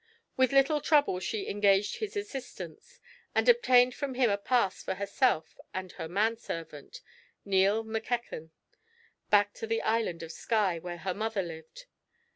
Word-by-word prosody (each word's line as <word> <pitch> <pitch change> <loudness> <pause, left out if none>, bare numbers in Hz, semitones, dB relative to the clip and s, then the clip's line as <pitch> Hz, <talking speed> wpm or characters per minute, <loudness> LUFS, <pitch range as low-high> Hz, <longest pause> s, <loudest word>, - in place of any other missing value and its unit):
With 260 -1 +3
little 275 +2 +3
trouble 290 - +3
she 200 +3 -3
engaged 200 0 +2
his 430 -1 -4
assistance, 405 - -7 0.4
and - - +2
obtained 255 - +5
from 275 -2 -4
him 245 -4 +3
a 200 - +1
pass 200 -3 +1
for 190 - -3
herself 200 -2 0 0.2
and 185 -1 -4
her - - -6
man 215 +6 +1
servant, 160 -8 -8 0.4
Neil 200 +3 +3
Mackechan, 225 -6 -4 0.8
back 205 0 +4
to 225 - -6
the 225 0 -1
Island 220 -7 0
of 165 - -7
Skye, 200 -4 0
where 175 +1 -6
her 185 +2 -3
mother 215 0 -2
lived. 160 - -10
215 Hz, 150 wpm, -29 LUFS, 185-250 Hz, 0.8 s, obtained